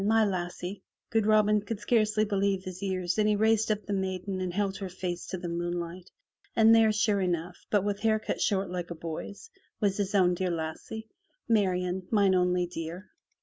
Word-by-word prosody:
My 220 +2 +4
lassie!'* 185 0 -3 0.3
Good 220 -2 +2
Robin 210 -1 +4
could 205 +1 -5
scarce 215 0 +2
believe 200 -3 +1
his 185 0 -7
ears 185 -1 -1
and 215 0 +3
he 210 - +3
raised 220 +1 +3
up 210 -2 -1
the 205 - -3
maiden 190 0 -2
and 185 -1 -2
held 195 +1 -1
her 195 -2 -5
face 180 -1 -4
to 185 - -4
the 175 0 -5
moon 175 +1 -2
light, 175 +2 -7 0.5
and 225 0 +7
there 225 -1 +6
sure 210 -1 +2
enough, 175 -1 -3
but 205 -3 +2
with 205 0 -1
hair 220 0 +3
cut 215 - -4
short 195 -3 +1
like 175 -1 -4
a 170 - -5
boy's, 170 - -7 0.3
was 200 -3 +1
his 205 0 -1
own 180 -2 +4
dear 185 +1 -1
lassie. 170 +7 -5 0.4
"Marian, 185 -4 +1
mine 200 -3 +4
only 180 -1 +2
dear!'' 170 +2 -7
190 Hz, 195 wpm, -29 LUFS, 180-210 Hz, 0.5 s, and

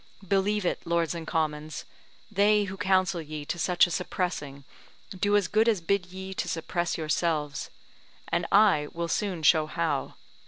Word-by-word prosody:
Believe 200 +1 +1
it, - - -1
Lords 170 -1 0
and 165 -1 -6
Commons, 155 -2 -2 0.5
they 210 +1 +4
who 195 -1 -5
counsel 190 -2 +1
ye 155 -1 -7
to 170 - -4
such 180 +1 +4
a 175 - -5
suppressing 165 -6 -3 0.5
do 205 +2 +2
as 205 - +1
good 220 +2 +3
as 215 -4 +2
bid 180 +2 0
ye 190 +1 -7
suppress 175 +1 -2
yourselves; 155 -2 -1 0.6
and 170 0 0
I 195 -8 +5
will 170 0 -3
soon 180 -1 -2
show 155 +1 +5
how. 155 -3 -2
175 Hz, 155 wpm, -27 LUFS, 155-195 Hz, 0.6 s, I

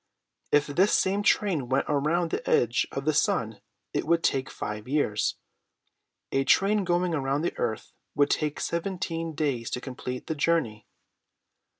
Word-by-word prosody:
If 145 0 +4
this 180 +8 +2
same 195 +2 +2
train 180 - +1
went 135 +1 +2
around 155 +4 +1
the - - -3
edge 120 0 +2
of 135 - -4
the 155 - +2
sun 110 -7 0 0.3
it - - 0
would 170 0 +2
take 135 0 +1
five 105 +1 -6
years. 130 -7 0 1.0
A 135 - +2
train 200 +8 +3
going 175 0 +1
around 140 0 0
the 175 - -1
earth 110 -2 -3 0.2
would 145 -1 +3
take 150 -2 0
seventeen 170 -2 -3
days 135 -7 -1
to - - -3
complete 125 -1 -6
the - - -2
journey." 145 -9 0
150 Hz, 155 wpm, -27 LUFS, 130-170 Hz, 1.0 s, If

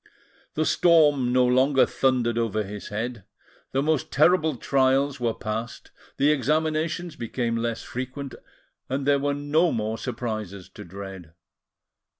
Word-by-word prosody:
The 155 - +1
storm 150 -9 +4
no 125 0 +4
longer 130 +2 +4
thundered 125 -3 +1
over 115 -2 0
his 105 0 -8
head, 115 +1 -4 0.5
the 135 +1 0
most 155 -3 0
terrible 160 0 +3
trials 135 +2 +1
were 115 -2 -1
passed, 110 +3 -5 0.3
the 145 +2 +4
examinations 155 +4 0
became 115 0 -2
less 115 0 -2
frequent, 130 +2 -6 0.6
and 135 +1 -2
there 140 0 +3
were 145 0 0
no 150 +4 +2
more 110 -1 -2
surprises 110 -6 -5
to - - -11
dread. 95 -2 -9
130 Hz, 135 wpm, -25 LUFS, 115-145 Hz, 0.6 s, storm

